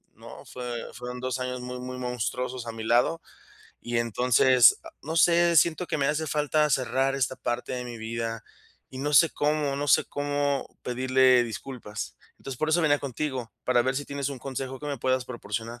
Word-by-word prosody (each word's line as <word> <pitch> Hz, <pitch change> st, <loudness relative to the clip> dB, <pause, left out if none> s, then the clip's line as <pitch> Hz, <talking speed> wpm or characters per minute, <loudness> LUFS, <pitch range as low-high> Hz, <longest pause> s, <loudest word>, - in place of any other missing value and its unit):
¿no?, -, -, -12 dB
fue 125 Hz, -1 st, -5 dB, 0.2 s
fueron 125 Hz, 0 st, -7 dB
2 130 Hz, 0 st, -3 dB
años 125 Hz, 0 st, -3 dB
muy 125 Hz, 0 st, -6 dB
muy 125 Hz, 0 st, -6 dB
monstruosos 125 Hz, 0 st, -3 dB
a -, -, -3 dB
mi 110 Hz, -1 st, -6 dB
lado. 120 Hz, +9 st, +2 dB, 0.6 s
Y 120 Hz, 0 st, -3 dB
entonces, 125 Hz, +1 st, +5 dB
ah, -, -, -9 dB
no 160 Hz, +3 st, -4 dB
sé, 170 Hz, 0 st, +5 dB
siento 170 Hz, +3 st, +3 dB
que 155 Hz, -, -2 dB
me 135 Hz, -, +1 dB
hace 155 Hz, +2 st, 0 dB
falta 150 Hz, +1 st, +1 dB
cerrar 135 Hz, +1 st, +1 dB
esta 130 Hz, -1 st, 0 dB
parte 120 Hz, +1 st, -3 dB
de 125 Hz, -1 st, -3 dB
mi 120 Hz, -1 st, -7 dB
vida 115 Hz, 0 st, -4 dB, 0.5 s
y 130 Hz, -, -8 dB
no 145 Hz, +2 st, -2 dB
sé 165 Hz, +2 st, +7 dB
cómo 145 Hz, -1 st, 0 dB
no 145 Hz, 0 st, -2 dB
sé -, -, +5 dB
cómo 145 Hz, -1 st, -1 dB
pedirle 130 Hz, 0 st, +4 dB
disculpas. 110 Hz, -1 st, -7 dB, 0.2 s
Entonces, 135 Hz, -2 st, -7 dB
por 155 Hz, -, 0 dB
eso 170 Hz, +1 st, +3 dB
venía 145 Hz, -2 st, +3 dB
contigo, 130 Hz, -3 st, -4 dB
para 125 Hz, -1 st, +3 dB
ver 130 Hz, +1 st, 0 dB
si 145 Hz, -, -2 dB
tienes 140 Hz, -1 st, -3 dB
un 135 Hz, -, -6 dB
consejo 135 Hz, 0 st, -5 dB
que 150 Hz, -, -6 dB
me 140 Hz, -3 st, -3 dB
puedas 130 Hz, +1 st, 0 dB
proporcionar. 115 Hz, 0 st, -5 dB
130 Hz, 195 wpm, -27 LUFS, 125-145 Hz, 0.6 s, sé